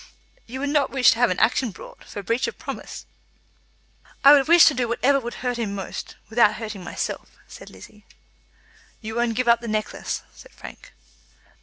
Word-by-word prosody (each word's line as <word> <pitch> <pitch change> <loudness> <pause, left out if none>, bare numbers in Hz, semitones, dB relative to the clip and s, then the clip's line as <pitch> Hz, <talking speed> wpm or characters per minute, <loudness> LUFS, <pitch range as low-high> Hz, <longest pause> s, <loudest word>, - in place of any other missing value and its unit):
"You 260 +3 -7
would 285 - -1
not 290 -2 +1
wish 260 -3 +4
to 230 - -2
have 245 -2 +4
an 180 - -1
action 235 +4 +2
brought, 195 - -13
for 205 - -8
breach 230 +5 0
of - - -7
promise?" - - -8 1.2
"I 280 +1 +9
would 280 -1 +4
wish 340 0 +7
to 310 - +5
do 250 -2 -1
whatever 270 +4 +2
would 240 -2 -7
hurt 245 -1 -1
him 205 -4 -3
most, 195 -2 -7
without 220 -1 +3
hurting 215 -4 -7
myself," - - -6
said - - -12
Lizzie. 210 0 -16 0.9
"You 220 0 -6
won't 235 -1 -1
give 255 +1 -1
up 235 0 +4
the 235 - -7
necklace?" 215 -1 -3
said - - -16
Frank. - - -13
235 Hz, 185 wpm, -23 LUFS, 215-260 Hz, 1.2 s, I